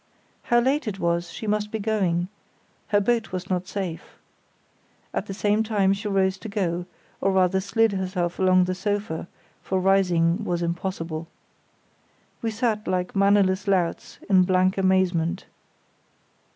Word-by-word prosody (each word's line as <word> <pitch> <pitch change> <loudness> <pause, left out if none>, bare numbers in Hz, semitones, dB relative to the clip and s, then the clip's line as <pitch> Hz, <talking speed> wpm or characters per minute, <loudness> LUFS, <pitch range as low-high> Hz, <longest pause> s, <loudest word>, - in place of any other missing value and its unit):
How 240 - +2
late 265 +2 +1
it 200 -2 -3
was, 170 -1 0
she 195 - -7
must 210 0 0
be 220 - -3
going—her 205 0 -2
boat 230 -2 0
was 185 +1 -5
not 180 0 -1
safe. 190 -5 -5 1.0
At - - -2
the 195 - -4
same 210 +1 +2
time 205 -3 +2
she 205 +2 -4
rose 190 -1 +1
to 220 - -7
go, 180 -4 -2 0.3
or 195 - +2
rather 190 0 +2
slid 225 +3 +2
herself 185 -3 -2
along 185 -1 +5
the 185 +1 -1
sofa, 195 -3 -3 0.3
for 190 - -1
rising 185 -1 +2
was 175 -4 -1
impossible. 170 -2 -3 1.1
We 230 - -1
sat 220 -1 -1
like 180 +1 -1
mannerless 195 -1 +3
louts, 185 -4 0
in 190 -3 +5
blank 185 0 +2
amazement. 185 -2 +1
190 Hz, 140 wpm, -24 LUFS, 180-205 Hz, 1.1 s, along